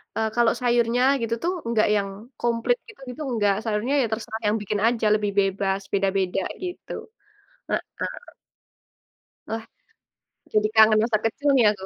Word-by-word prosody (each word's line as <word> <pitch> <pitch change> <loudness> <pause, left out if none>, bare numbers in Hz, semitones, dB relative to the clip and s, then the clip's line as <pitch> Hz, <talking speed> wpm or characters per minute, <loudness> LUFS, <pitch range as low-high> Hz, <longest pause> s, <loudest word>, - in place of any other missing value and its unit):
eee, 220 - +1
kalau 235 -1 +4
sayurnya 240 0 +2 0.2
gitu 230 0 0
tuh 350 +2 +1
enggak 230 -2 +2
yang 200 -1 0 0.3
komplit 235 - +1
gitu-gitu 270 - -10
enggak, 205 -4 +2
sayurnya 220 +4 -1
ya - - +2
terserah 220 0 -4
yang 210 +1 +2
bikin 205 0 -2
aja 230 -2 0
lebih 210 -1 -1
bebas, 195 0 0
beda-beda 195 -1 +1 0.2
gitu. 360 -1 -6 0.8
Heeh. - - -3 1.6
Wah, 225 0 -3 0.9
jadi 215 0 +3
kangen 220 0 +7
masa 225 -1 +2
kecil 285 +6 0
nih 245 -4 +5
aku. 190 -2 -8
220 Hz, 140 wpm, -24 LUFS, 205-240 Hz, 1.6 s, kangen